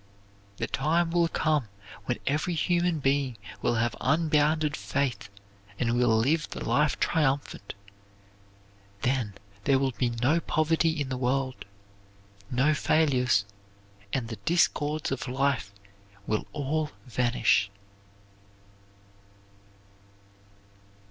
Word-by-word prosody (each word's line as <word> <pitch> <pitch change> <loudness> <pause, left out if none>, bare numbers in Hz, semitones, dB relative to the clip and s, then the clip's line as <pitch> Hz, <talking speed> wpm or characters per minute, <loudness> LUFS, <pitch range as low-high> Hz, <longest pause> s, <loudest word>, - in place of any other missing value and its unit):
The - - -1
time 165 +5 +1
will 170 -1 +3
come 155 -6 0 0.4
when 125 - -1
every 155 +5 0
human 175 0 +1
being 135 -3 0 0.2
will 120 - +1
have 115 +1 0
unbounded 155 0 +2
faith 120 +6 -2 0.5
and 115 +1 0
will 120 -2 +3
live 150 +8 +1
the - - -6
life 150 0 +2
triumphant. 140 -10 0 1.3
Then 125 -6 0 0.3
there 135 - +4
will 135 0 +1
be 125 0 0
no 125 +8 +1
poverty 160 0 +1
in 140 -2 -2
the 130 - -2
world, 130 +1 -1 0.8
no 130 +5 +3
failures, 135 -9 +2 0.7
and 125 -4 -1
the 115 -1 -6
discords 155 -3 +1
of 135 0 -3
life 130 -5 0 0.5
will 110 - -1
all 150 +1 -1 0.2
vanish. 120 -5 +2
135 Hz, 105 wpm, -28 LUFS, 125-155 Hz, 1.3 s, there